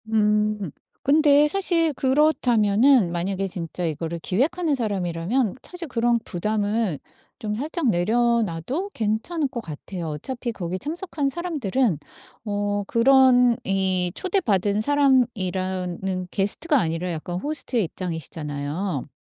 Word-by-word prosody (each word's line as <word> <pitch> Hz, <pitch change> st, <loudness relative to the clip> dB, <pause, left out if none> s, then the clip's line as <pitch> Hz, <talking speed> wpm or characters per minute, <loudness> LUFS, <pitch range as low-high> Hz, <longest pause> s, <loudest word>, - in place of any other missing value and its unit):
음 210 Hz, -4 st, +1 dB, 0.3 s
근데 295 Hz, 0 st, +5 dB
사실 335 Hz, -2 st, +2 dB
그렇다면은 255 Hz, -, +3 dB
만약에 190 Hz, +3 st, -2 dB
진짜 175 Hz, -1 st, -4 dB
이거를 165 Hz, +1 st, -3 dB
기획하는 290 Hz, -, 0 dB
사람이라면 200 Hz, 0 st, -1 dB
사실 355 Hz, -2 st, -7 dB
그런 240 Hz, -2 st, +1 dB
부담을 210 Hz, -1 st, -1 dB, 0.4 s
좀 210 Hz, -4 st, -3 dB
살짝 295 Hz, +3 st, -1 dB
내려놔도 230 Hz, -, 0 dB
괜찮을 225 Hz, +9 st, -1 dB
것 240 Hz, -2 st, -5 dB
같아요. 170 Hz, +1 st, -7 dB
어차피 240 Hz, -, -4 dB
거기 185 Hz, -4 st, -4 dB
참석한 315 Hz, -, -3 dB
사람들은 265 Hz, -, 0 dB, 0.5 s
어 205 Hz, -1 st, -1 dB
그런 250 Hz, 0 st, +5 dB
이 190 Hz, -2 st, +1 dB
초대받은 215 Hz, -, +1 dB
사람이라는 190 Hz, -9 st, 0 dB
게스트가 280 Hz, -, +1 dB
아니라 170 Hz, -1 st, -1 dB
약간 175 Hz, +2 st, -4 dB
호스트의 280 Hz, -4 st, -1 dB
입장이시잖아요. 160 Hz, -2 st, -4 dB
215 Hz, 290 characters per minute, -24 LUFS, 180-270 Hz, 0.5 s, 근데